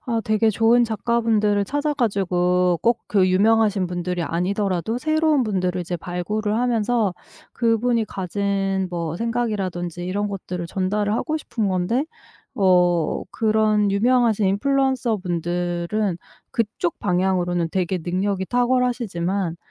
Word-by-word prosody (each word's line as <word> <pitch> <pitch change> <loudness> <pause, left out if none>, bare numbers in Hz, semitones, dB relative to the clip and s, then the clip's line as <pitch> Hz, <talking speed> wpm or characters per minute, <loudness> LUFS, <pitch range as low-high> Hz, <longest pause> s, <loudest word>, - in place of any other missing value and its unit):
아 230 -3 -1
되게 215 +1 +2
좋은 230 +3 +4
작가분들을 220 -2 +1
찾아 290 +5 -1
가지고 180 - +1
꼭 235 0 +3
그 190 -3 +3
유명하신 205 0 +3
분들이 175 0 -3
아니더라도 190 +5 -1
새로운 310 -1 +2
분들을 185 -4 -1
이제 175 0 -3
발굴을 205 +5 -3
하면서 230 -4 +1 0.4
그분이 230 0 +1
가진 195 0 -1
뭐 170 -2 -3
생각이라든지 195 -7 -2
이런 205 +3 -2
것들을 180 -3 -5
전달을 205 +3 -1
하고 310 +6 -1
싶은 220 -8 -2
건데 190 +10 0 0.5
어 180 -5 +2
그런 215 -2 +2
유명하신 225 -1 +2
인플루언서 260 +2 +1
분들은 175 +2 -2 0.3
그쪽 210 -6 -2
방향으로는 180 -2 0
되게 185 -1 -1
능력이 190 +2 -1
탁월하시지만 235 -8 0
200 Hz, 310 characters per minute, -22 LUFS, 180-230 Hz, 0.5 s, 좋은